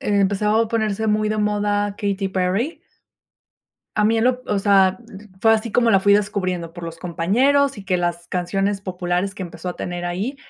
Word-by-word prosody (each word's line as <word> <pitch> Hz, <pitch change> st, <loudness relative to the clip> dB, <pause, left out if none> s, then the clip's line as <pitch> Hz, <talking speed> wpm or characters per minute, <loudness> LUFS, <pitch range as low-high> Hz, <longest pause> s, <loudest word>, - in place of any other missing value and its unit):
empezaba 205 Hz, +2 st, +2 dB
a 230 Hz, -, 0 dB
ponerse 220 Hz, -2 st, -1 dB
muy 215 Hz, 0 st, +1 dB
de 215 Hz, -, -1 dB
moda 205 Hz, -1 st, 0 dB
Katy 200 Hz, -1 st, -1 dB
Perry. 190 Hz, -, -1 dB, 1.2 s
A 210 Hz, -, +3 dB
mí 225 Hz, +2 st, +3 dB
en 225 Hz, -, +1 dB
lo, 250 Hz, 0 st, +1 dB
o 205 Hz, -, 0 dB
sea, 195 Hz, -2 st, +4 dB, 0.4 s
fue 225 Hz, +1 st, +5 dB
así 225 Hz, +1 st, 0 dB
como 235 Hz, +2 st, +2 dB
la 195 Hz, -3 st, +4 dB
fui 200 Hz, +1 st, +4 dB
descubriendo 185 Hz, -5 st, -1 dB
por 175 Hz, 0 st, -10 dB
los 165 Hz, 0 st, -7 dB
compañeros 235 Hz, -, +1 dB
y 195 Hz, -, -9 dB
que 185 Hz, -1 st, +1 dB
las 175 Hz, -1 st, -2 dB
canciones 195 Hz, +3 st, -1 dB
populares 180 Hz, 0 st, -2 dB
que 195 Hz, -, -5 dB
empezó 180 Hz, +1 st, -7 dB
a 180 Hz, -, -5 dB
tener 175 Hz, 0 st, -5 dB
ahí, 195 Hz, +10 st, -3 dB
200 Hz, 190 wpm, -21 LUFS, 180-215 Hz, 1.2 s, fue